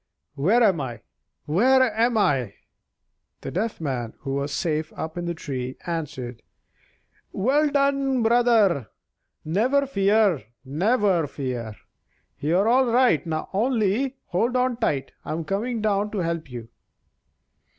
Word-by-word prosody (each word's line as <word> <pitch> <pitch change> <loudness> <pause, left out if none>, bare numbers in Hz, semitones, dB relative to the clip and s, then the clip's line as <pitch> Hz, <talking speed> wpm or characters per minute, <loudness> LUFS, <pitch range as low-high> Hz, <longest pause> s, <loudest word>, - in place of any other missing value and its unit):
Where 195 - +3
am 190 -8 +3
I? 120 -5 -6 0.4
Where 255 - +4
am 230 +1 +2
I?" 130 - +1 0.9
The 135 - -6
Deaf 215 +7 -2
Man 130 -7 -3
(who 135 -1 -4
was 140 +1 -2
safe 155 0 -1
up 160 0 -6
in 175 0 -4
the 170 0 -3
tree) 130 -4 -5
answered: 130 -8 -5 0.9
"Well 285 +9 +2
done, 275 -3 +1
brother! 225 - +3 0.6
never 245 - +2
fear! 200 - +2 0.2
never 185 - +1
fear! 125 -6 -5 0.6
You're 175 +8 +2
all 255 +2 +4
right, 240 - +3 0.3
only 235 +4 +1
hold 230 +8 0
on 250 -1 +1
tight. 135 - -1
I'm 160 +1 -4
coming 220 +5 -2
down 205 -1 +1
to - - -2
help 170 -4 -2
you." 120 -2 -8
190 Hz, 125 wpm, -24 LUFS, 145-240 Hz, 0.9 s, Where